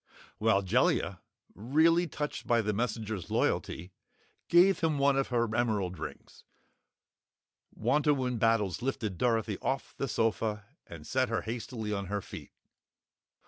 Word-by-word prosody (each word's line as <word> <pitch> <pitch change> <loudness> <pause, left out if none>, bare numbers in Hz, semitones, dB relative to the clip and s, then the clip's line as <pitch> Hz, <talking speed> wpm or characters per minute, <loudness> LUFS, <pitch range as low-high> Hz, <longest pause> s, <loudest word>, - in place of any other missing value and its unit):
While 105 -3 +3
Jellia, 95 - +1 0.3
really 160 - +3
touched 150 -1 -5
by 120 -1 +3
the 105 0 0
messenger's 110 -4 -3
loyalty, 90 +4 -1 0.6
gave 180 +2 +6
him 160 -4 +1
one 140 0 +3
of 135 0 +1
her 120 -3 0
emerald 105 -7 0
rings, 80 - -9 1.3
Wantowin 135 -5 +1
Battles 115 -3 +1
lifted 110 -8 -3
Dorothy 110 -4 +1
off 135 0 -2
the 135 - -2
sofa 110 -3 -1 0.2
and 80 -3 -10
set 130 -1 0
her 115 - -1
hastily 115 -1 -4
on 100 -1 -3
her 100 +2 -1
feet. - - -10
115 Hz, 130 wpm, -30 LUFS, 105-135 Hz, 1.3 s, gave